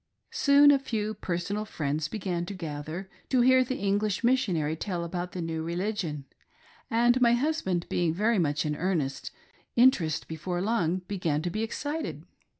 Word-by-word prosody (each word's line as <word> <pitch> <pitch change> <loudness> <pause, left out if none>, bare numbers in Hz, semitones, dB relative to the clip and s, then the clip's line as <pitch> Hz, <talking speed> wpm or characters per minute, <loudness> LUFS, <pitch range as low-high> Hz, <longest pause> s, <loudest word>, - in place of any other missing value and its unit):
Soon 290 -10 +6
a 280 - +4
few 215 -5 -2
personal 195 +2 -3
friends 155 -6 -2
began 180 -2 -3
to 200 - -5
gather 160 +2 -5 0.2
to 255 -2 +3
hear 260 +1 +6
the 255 +1 -3
English 200 +1 0
Missionary 185 - +1
tell 175 0 -3
about 175 +1 -4
the 180 - -3
new 165 -1 -3
religion, 170 -3 -3 0.6
and 240 +2 +3
my 235 -1 +5
hus 300 +6 +1
band 175 -2 -1
being 175 -2 +1
very 210 +5 +1
much 155 -2 0
in 150 0 -1
earnest, 160 -5 -1 0.5
interest 200 -11 +3
before 175 +3 -4
long 185 -3 0
began 165 -7 -1
to 175 - -2
be 215 - -2
excited. 290 +8 -4
185 Hz, 160 wpm, -28 LUFS, 165-235 Hz, 0.6 s, Soon